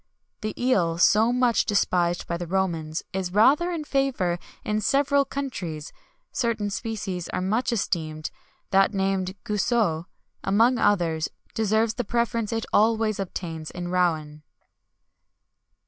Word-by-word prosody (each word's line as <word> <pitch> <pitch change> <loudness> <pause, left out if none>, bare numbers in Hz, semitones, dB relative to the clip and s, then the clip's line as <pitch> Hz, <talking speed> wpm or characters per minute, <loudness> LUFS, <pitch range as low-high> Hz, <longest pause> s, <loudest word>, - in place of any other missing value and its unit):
"The 215 -1 -4
eel, 185 -10 +2
so 215 +6 +5
much 245 -2 +3
despised 175 -4 +1
by 170 - -2
the 175 0 -5
Romans, 165 -4 -1
is 185 -2 -2
rather 270 - +4
in 335 -3 -3
favour 265 -12 0 0.3
in 215 0 0
several 280 +3 +3
countries; 185 - -5 0.4
certain 225 -4 -1
species 195 -5 -4
are - - -2
much 215 +8 0
esteemed, 155 -8 -2 0.4
that 195 +2 +4
named 190 -1 0
Guiseau, 210 -6 +1 0.4
among 230 +5 +3
others, 165 -7 +2 0.2
deserves 220 +1 +1
the 245 - -2
preference 230 -1 -1
it 225 -1 -2
always 220 -1 +3
obtains 165 -4 -5
at 175 - -4
Rouen." 165 -4 0
200 Hz, 125 wpm, -25 LUFS, 175-230 Hz, 0.4 s, so